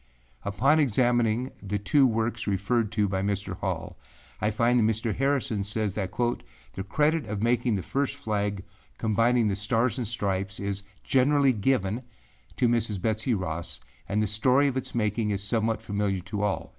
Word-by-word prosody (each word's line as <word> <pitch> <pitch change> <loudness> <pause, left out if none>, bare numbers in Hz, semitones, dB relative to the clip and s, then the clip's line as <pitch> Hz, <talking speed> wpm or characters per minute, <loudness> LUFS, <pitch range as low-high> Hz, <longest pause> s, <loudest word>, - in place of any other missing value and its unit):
â - - -8
Upon 140 +9 +3
examining 120 -2 +2
the 105 +1 -2
two 130 +7 +4
works 115 0 -1
referred 105 +3 0
to 105 -2 +2
by 95 0 -1
Mr. 100 0 -2
Hall, - - -4 0.4
I 105 - +2
find 120 +3 +2
that - - +3
Mr. 110 0 -2
Harrison 135 -6 0
says 105 0 -1
that 95 -3 -2
âthe 120 +3 -1 0.5
credit 150 +1 +2
of 105 0 -3
making 120 -1 +2
the 95 - -3
first 140 0 -1
flag 100 -2 -2 0.3
combining 115 +2 +2
the 100 - 0
Stars 115 +5 0
and 120 - -2
Stripes 95 -3 -2
is 100 0 -3 0.2
generally 135 +1 +3
given 110 -1 0 0.6
to 125 - +3
Mrs. 115 -4 +1
Betsey 110 +4 0
Ross, 85 -7 -4 0.3
and 105 +2 +1
the - - +2
story 125 +7 +3
of 135 - -1
its 130 - -4
making 105 -1 0
is 100 -1 -1
somewhat 110 0 0
familiar 100 -3 -1
to 100 +2 -4
all. 105 -2 -1
110 Hz, 170 wpm, -27 LUFS, 100-120 Hz, 0.6 s, two